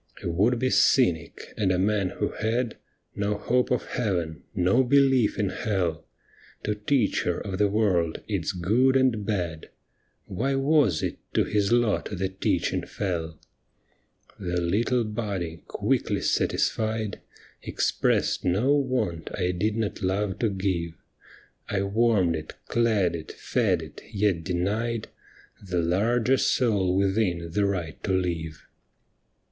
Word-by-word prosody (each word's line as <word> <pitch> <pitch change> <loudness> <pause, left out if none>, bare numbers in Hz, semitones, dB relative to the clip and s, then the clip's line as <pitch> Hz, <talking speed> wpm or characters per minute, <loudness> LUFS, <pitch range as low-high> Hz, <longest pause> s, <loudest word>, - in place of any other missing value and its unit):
A - - -2
would 105 +9 +2
be 130 +2 0
cynic, 85 - +2
and 100 -3 +2
a 90 - +2
man 100 0 +1
who - - -2
had 115 +2 -1 0.4
No 100 +1 0
hope 125 +4 +1
of - - 0
Heaven, 85 - -2
no 95 +9 +3
belief 135 -3 +3
in 100 -2 0
Hell, 95 -8 -2 0.6
To 105 - 0
teach 105 +2 +1
her 90 - -1
of 95 -2 -5
the 105 - +4
world, 95 -6 +1
its - - -1
good 115 +10 +2
and 125 -5 +2
bad, 85 -6 -2 0.6
Why 130 +9 -1
was 135 - +3
it - - -3 0.2
to - - +4
his 105 0 0
lot 120 -3 +2
the 95 -1 -2
teaching 95 0 -1
fell? 85 -4 -3 1.0
The 90 -3 -1
little 110 +8 +1
body, 100 -7 -4
quickly - - 0
satisfied. 110 -2 0 0.4
Expressed - - 0
no 105 +11 +2
want 125 - -1
I 90 -2 +1
did 105 +5 -1
not 110 -2 -2
love 95 +1 -1
to 115 - +2
give 95 -4 -2 0.4
— - - -27
I - - 0
warmed 100 -4 +2
it, 80 0 -6
clad 105 -7 +2
it, 80 -2 -7
fed - - 0
it, - - -11
yet 100 -5 +1
denied 105 +6 -1 0.5
The 90 -3 -1
larger 115 +9 +2
soul 100 -10 +2
within 95 -4 0
the 100 +3 +1
right 85 -5 -3
to - - -1
live. 85 -3 -2
100 Hz, 140 wpm, -26 LUFS, 90-115 Hz, 1.0 s, the